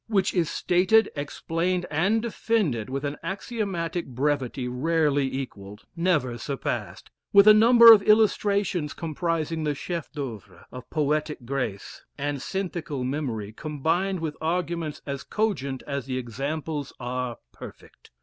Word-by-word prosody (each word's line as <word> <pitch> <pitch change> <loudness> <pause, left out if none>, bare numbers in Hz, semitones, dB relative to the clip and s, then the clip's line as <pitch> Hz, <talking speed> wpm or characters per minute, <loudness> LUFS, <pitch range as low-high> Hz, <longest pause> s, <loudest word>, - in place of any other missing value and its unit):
which 200 -4 +1
is 170 -4 +1
stated, 185 +5 +3
explained, 165 +5 -2
and 195 +9 +2
defended 205 - -1
with 135 +2 -3
an 145 +1 -2
axiomatic 190 -5 -3
brevity 130 -1 -1
rarely 145 +1 +1
equalled, 105 -5 -7
never 155 -9 0
surpassed 140 -2 -4 0.2
with 200 +1 +7
a 215 - +11
number 230 +1 +9
of 210 - +5
illustrations 200 -6 +2
comprising 165 0 -2
the 150 -1 0
chef 170 +2 -5
d'oeuvre 130 -8 -7
of 125 -1 -10
poetic 150 -3 -1
grace, 125 -6 -4
and 145 -1 -2
synthical 170 -8 -3
melody 125 -6 -3
combined 165 - -1
with 160 -2 -3
arguments 165 -2 -2
as 140 -1 -4
cogent 140 - -2
as 140 -2 -4
the 130 -1 -2
examples 140 +4 -4
are 125 -1 -3
perfect. - - -13
155 Hz, 130 wpm, -26 LUFS, 135-180 Hz, 0.2 s, a